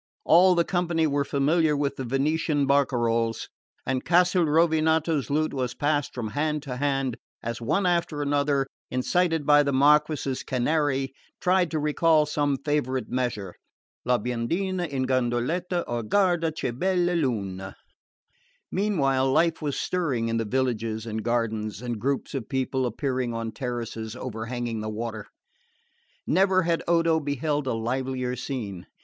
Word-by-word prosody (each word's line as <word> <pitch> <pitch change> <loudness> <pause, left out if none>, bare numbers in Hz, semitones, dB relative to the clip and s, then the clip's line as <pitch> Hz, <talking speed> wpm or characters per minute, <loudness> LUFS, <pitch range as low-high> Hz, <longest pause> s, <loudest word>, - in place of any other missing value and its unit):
All 180 +3 +6
the 170 - +3
company 175 -3 +1
were 145 -1 +1
familiar 150 +2 +2
with 140 -1 -1
the 135 - -5
Venetian 145 +3 0
bacaroles, 120 -5 +1 0.4
and 130 0 -1
Castelrovinato's 160 -3 +3
lute 155 +2 0
was 125 -2 -2
passed 145 -1 0
from 115 -4 -3
hand 150 +3 -1
to 130 -4 -5
hand, 135 -3 0 0.3
as 115 0 -4
one 185 - +1
after 170 -4 0
another, 140 -1 +1 0.2
incited 165 +4 +1
by 145 0 +6
the 140 -1 0
Marquess's 145 0 +3
Canary, 135 0 0 0.3
tried 180 -1 +2
to 160 - -2
recall 150 +1 +3
some 145 -2 0
favourite 130 -4 -1
measure 115 -8 -2 0.5
"La 125 0 +2
biondina 170 - -2
in 135 -2 -1
gondoleta" 130 +8 0
or 120 0 -2
"Guarda, 175 - +2
che 155 -5 -3
bella 180 +6 +1
luna." 100 - -2 1.0
Meanwhile 135 -10 +1
life 165 +4 +2
was 145 -3 -2
stirring 135 -11 -1
in 115 - 0
the 115 - -1
villages 115 -2 -1
and 110 -1 -3
gardens, 110 -3 -1
and 120 -2 -4
groups 140 +2 -1
of 130 -6 -4
people 130 -1 0
appearing 125 0 -2
on 115 0 -3
the - - -11
terraces 115 -2 -5
overhanging 120 -1 -4
the 110 - -4
water. 110 -1 -5 1.0
Never 185 +2 +3
had 165 0 0
Odo 165 -1 +3
beheld 145 0 -2
a 130 - 0
livelier 125 +2 -2
scene. 115 -8 -5
135 Hz, 145 wpm, -26 LUFS, 120-160 Hz, 1.0 s, All